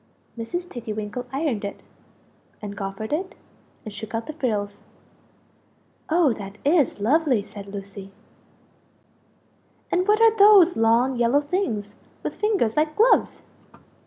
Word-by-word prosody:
Mrs. 345 +11 -5
Tiggy 235 -7 -6
winkle 215 +4 -5
ironed 270 -6 -2
it, 200 - -6 0.8
and 205 -1 -7
goffered 195 +4 -5
it, 375 +6 -3 0.5
and 215 - -7
shook 220 +2 -7
out 225 - -3
the 310 - -7
frills. 210 -8 -3 1.3
"Oh 320 -5 +3
that 200 -1 -9
is 290 -6 +2
lovely!" 260 0 +2
said 200 -1 -11
Lucie. 195 -1 -9 1.8
"And 365 +2 +1
what 425 +1 +4
are 450 -1 +5
those 400 -4 +7
long 235 +3 +2
yellow 240 +4 +3
things 285 - -3 0.3
with - - -3
fingers 400 - 0
like 305 0 0
gloves?" 465 +3 +3
245 Hz, 130 wpm, -23 LUFS, 210-330 Hz, 1.8 s, those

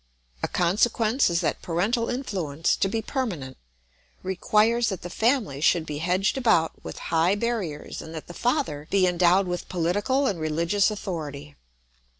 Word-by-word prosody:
A - - 0
consequence 220 +7 +2
is 170 0 +1
that 170 - -1
parental 210 +8 0
influence, 180 - -1
to - - +1
be 225 +2 -2
permanent, 180 - -3 0.7
requires 215 +5 +2
that 190 -4 -5
the 175 - -6
family 220 - +1
should 165 +1 +3
be 150 -2 -5
hedged 185 - +1
about 170 -10 +3
with - - -7 0.2
high 165 +4 +3
barriers 205 -9 -3
and 160 - -9
that 155 - -6
the 175 - -10
father 240 - -1
he 195 -2 +3
endowed 180 +2 +3
with 175 -1 -4
political 205 +10 +1
and 195 -9 0
religious 165 +6 +1
authority. 150 -8 -6
185 Hz, 155 wpm, -25 LUFS, 165-225 Hz, 0.7 s, should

